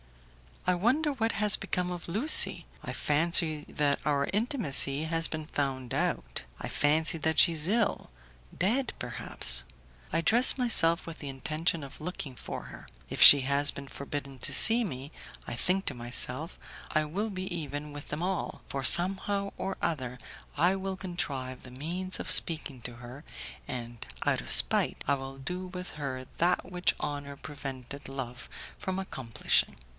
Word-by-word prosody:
I 180 - +2
wonder 260 - 0
what 230 -4 -2
has 210 -2 +2
become 180 0 -3
of 175 -1 -7
Lucie; 220 - +5 0.2
I - - -6
fancy 155 0 +2
that 145 -1 -1
our 140 -2 0
intimacy 190 - +1
has 165 0 0
been 155 -1 -7
found 135 -5 -4
out, - - -3 0.2
I - - -6
fancy 155 +3 +2
that 160 +1 0
she 170 - +8
is 155 0 +1
ill 215 +2 -1 0.5
dead, 240 +7 -1
perhaps. 60 - +1 0.5
I 165 - +1
dress 235 +11 +5
myself 180 -9 +2
with 165 -1 -9
the 140 - -7
intention 155 +4 -3
of 140 +2 -12
looking 155 -5 -6
for - - -8
her. - - -13 0.2
If - - -5
she 140 - +11
has 140 +2 +2
been 140 0 -5
forbidden 140 -1 -7
to - - -2
see 230 +2 +6
me, 140 - -7 0.4
I - - -5
think 185 +9 +1
to - - 0
myself, 125 +6 -2 0.3
I 155 -1 0
will 200 +9 -4
be 185 -1 -6
even 145 -2 -6
with 145 0 -10
them 150 +3 -5
all, 190 0 -4
for 135 -1 -5
somehow 195 +6 +2
or 195 - -5
other 130 -6 -3 0.4
I 175 +5 +2
will 190 0 -5
contrive 140 -9 -6
the 125 - -13
means 175 +8 -4
of - - -2
speaking 155 -6 +5
to 120 - -7
her, 125 +4 -12 0.4
and 120 -4 -7 0.2
out - - 0
of - - -4
spite - - +7
I 140 - +2
will 135 0 -9
do 180 +7 -6
with 180 0 -8
her 130 -3 -6
that 180 +2 0
which 180 0 0
honour 145 -1 -5
prevented 140 -2 -9
love 135 0 -8 0.3
from 190 0 -4
accomplishing. 130 - -1
155 Hz, 165 wpm, -28 LUFS, 135-185 Hz, 0.5 s, she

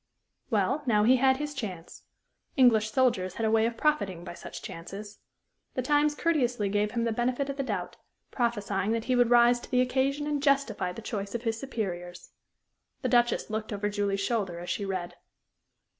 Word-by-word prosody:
Well, 235 +6 +1
now 210 -3 +4
he 255 +4 +5
had 265 +1 +4
his 295 +1 -4
chance. 190 - -7 0.5
English 225 -5 +5
soldiers 215 -8 +1
had 225 - -1
a 220 - +2
way 225 0 +4
of 230 -1 -5
profiting 205 - 0
by 175 - -7
such - - -9
chances. 200 +5 -8 0.6
The 255 - -1
Times 295 +2 +2
courteously 250 - +1
gave 205 +1 +1
him 235 -1 0
the 230 - 0
benefit 250 +4 -1
of 275 - -9
the - - 0
doubt, 270 - -4 0.3
prophesying 210 -4 0
that 230 -1 -1
he 255 - +1
would 245 -1 +4
rise 240 0 +5
to - - -12
the 250 - +2
occasion 270 +3 0
and 295 -1 -1
justify 275 -10 +1
the 220 +5 -9
choice 205 -2 -4
of 235 - -3
his 225 -1 -1
superiors. 180 -9 -5 0.7
The - - +1
Duchess 240 -2 +2
looked 220 0 -3
over 205 0 -1
Julie's 200 -1 -1
shoulder 195 -5 -1
as 175 - -5
she 200 - -2
read. 180 -2 -4
230 Hz, 190 wpm, -28 LUFS, 200-260 Hz, 0.7 s, he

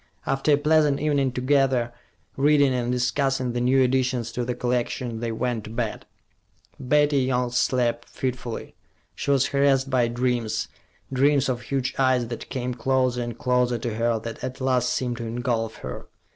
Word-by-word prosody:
After 135 +2 +2
a - - +5
pleasant 150 -1 +3
evening 145 -3 +1
together, 130 -2 +1 0.4
reading, 145 -1 +4
and 125 -1 -1
discussing 130 0 0
the 120 - -1
new 130 +2 +4
additions 125 -2 0
to 125 - -2
the 120 0 -2
collection, 120 -1 -2
they 115 0 -2
went 115 -1 -2
to - - -8
bed. 115 -1 -4 0.7
Betty 145 +2 +3
Young 125 -1 0
slept 120 -1 0
fitfully. 125 -2 -4 0.4
She - - -5
was 140 -2 +4
harassed 140 -1 +2
by 125 -2 +3
dreams, 120 -2 -1 0.4
dreams 140 +1 +3
of 125 -1 -1
huge 135 -1 -2
eyes 130 -3 +2
that 120 - -7
came 125 -1 -3
closer 130 0 +1
and 120 -1 -5
closer 125 -1 +1
to 115 0 -3
her, 115 +1 +1
that 115 +1 -7
at 130 +1 -5
last 130 -2 +1
seemed 125 -2 -1
to 115 -1 -5
engulf 115 -1 -2
her. 65 - -7
125 Hz, 165 wpm, -24 LUFS, 120-135 Hz, 0.7 s, a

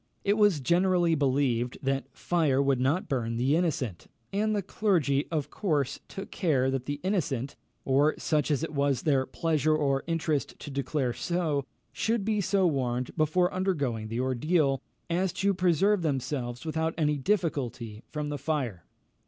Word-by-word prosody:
It 200 - +3
was 205 -8 +3
generally 175 +3 +3
believed 130 -4 +1
that 135 0 0
fire 150 -2 +1
would 140 -2 +2
not 140 +8 +1
burn 115 -4 -1
the 130 +5 +2
innocent, 155 - -1 0.3
and 215 +2 +1
the 200 - -1
clergy, 165 -9 +1
of 150 -3 -2
course, 150 -10 -1
took 195 - -8
care 135 -7 +1
that 130 -1 -3
the 145 0 -3
innocent, 140 - -1 0.3
or 140 +3 +3
such 155 -1 0
as 150 0 +1
it 165 - -4
was 140 -3 +1
their 135 -4 +2
pleasure 155 +1 +1
or 140 -3 +1
interest 160 -3 -1
to 145 - -8
declare 135 -2 -1
so, 160 -5 -1 0.3
should 215 +8 0
be 215 -1 +1
so 195 0 +2
warned 125 -5 -1
before 170 +3 +2
undergoing 145 - -1
the 115 +2 -3
ordeal, 135 +2 +1 0.3
as 180 +2 0
to 200 +1 +1
preserve 185 +2 +2
themselves 130 -4 -2
without 160 +1 -1
any 150 -2 +1
difficulty 130 - -1
from 150 -1 -3
the 145 -1 -4
fire. 130 - -2
150 Hz, 160 wpm, -28 LUFS, 135-175 Hz, 0.3 s, It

